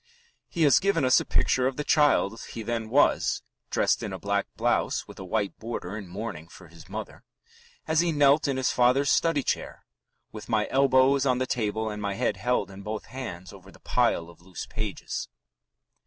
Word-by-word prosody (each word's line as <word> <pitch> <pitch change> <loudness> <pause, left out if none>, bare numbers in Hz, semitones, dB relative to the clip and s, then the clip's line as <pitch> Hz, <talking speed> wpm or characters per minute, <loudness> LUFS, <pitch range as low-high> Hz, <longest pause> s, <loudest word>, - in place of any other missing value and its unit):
He 165 - 0
has 145 -3 +6
given 195 -8 +1
us 130 - +5
a - - -4
picture 130 0 +2
of 130 - -3
the 150 - -2
child 145 -9 +3
he 115 - -5
then 115 0 -3
was 140 +5 +2 0.3
(dressed - - +1
in - - -4
a - - -4
black 100 0 -1
blouse - - 0
with - - -12
a - - -6
white 100 +2 -2
border 110 -4 -5
in 105 -3 -7
mourning 90 -4 -6
for 85 0 -15
his 80 -2 -15
mother) - - -7 0.6
as 160 0 +2
he 170 0 +2
knelt 145 0 +4
in 135 -2 -1
his 130 - +1
father's 130 +3 +3
study 165 -4 +2
chair, - - -3 0.5
"with 110 +1 -10
my 110 -2 +1
elbows 135 0 +4
on 125 -1 +2
the 130 - 0
table 110 -3 -2
and 105 0 -6
my 100 -1 -2
head 120 +3 0
held 125 -5 0
in 95 +1 -10
both 105 +1 -5
hands 95 -10 -7
over 95 -1 -14
the - - -18
pile 85 - +1
of 85 0 -16
loose 90 -1 -8
pages." 110 -5 -5
115 Hz, 200 wpm, -27 LUFS, 100-135 Hz, 0.6 s, has